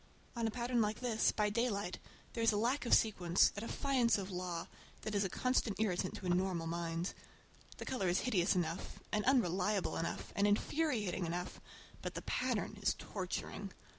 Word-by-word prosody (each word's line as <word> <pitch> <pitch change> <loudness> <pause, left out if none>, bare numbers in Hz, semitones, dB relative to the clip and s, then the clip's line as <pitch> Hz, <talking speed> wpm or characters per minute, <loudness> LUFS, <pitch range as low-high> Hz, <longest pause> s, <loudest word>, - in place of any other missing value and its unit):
On 230 -1 0
a - - +1
pattern 240 +1 0
like 210 0 0
this, 230 -3 +2
by 210 -1 +1
daylight, 205 -5 -1 0.3
there 230 - -2
is 230 0 +5
a 210 - 0
lack 245 +4 +1
of - - +3
sequence, 180 -5 +4
a - - -3
defiance 240 -1 +2
of 195 -1 -4
law, 180 -2 -3 0.4
that 215 - -4
is 200 0 +2
a 190 - -1
constant 250 -2 0
irritant 185 -4 0
to 190 - -7
a - - 0
normal 180 -2 +1
mind. 170 +1 -2 0.6
The - - -6
color 245 -8 -1
is 175 +1 +2
hideous 200 -6 +2
enough, 170 -1 -2
and 210 0 +1
unreliable 205 -5 +2
enough, 165 - -3
and 200 +1 +3
infuriating 210 - +1
enough, 175 +2 -4 0.4
but - - -4
the - - -4
pattern 230 -4 -1
is - - +2
torturing. 195 0 -5
205 Hz, 180 wpm, -36 LUFS, 180-230 Hz, 0.6 s, is